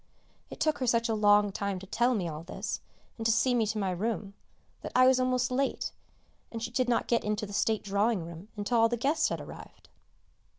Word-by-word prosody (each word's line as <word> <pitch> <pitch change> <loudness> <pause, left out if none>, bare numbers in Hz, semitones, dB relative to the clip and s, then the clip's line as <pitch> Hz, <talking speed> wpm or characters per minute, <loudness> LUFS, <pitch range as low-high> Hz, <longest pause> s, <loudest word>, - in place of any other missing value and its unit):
It - - -10
took 310 -1 +1
her 255 - -1
such 230 0 +2
a - - +2
long 205 -1 +4
time 200 0 -2
to 190 - -9
tell 240 +5 +1
me 185 -5 -1
all 155 -1 -5
this, 170 - -5 0.4
and 225 - -4
to - - +4
see 245 +3 +2
me 230 -3 +2
to 215 - -2
my 195 -3 0
room, 200 +1 -3 0.5
that - - -6
I 255 0 +7
was 260 0 +5
almost 255 0 +1
late, 270 +2 -1 0.6
and 230 - -5
she 230 +1 -4
did 250 0 0
not 235 - +1
get 235 - +2
into 210 +1 -1
the 205 - -9
state 220 +1 +1
drawing 200 -1 +1
room 170 +3 -10
until 220 +3 +1
all 225 0 +5
the 240 - -1
guests 295 +7 +1
had - - -3
arrived. - - -12
225 Hz, 225 wpm, -29 LUFS, 200-245 Hz, 0.6 s, I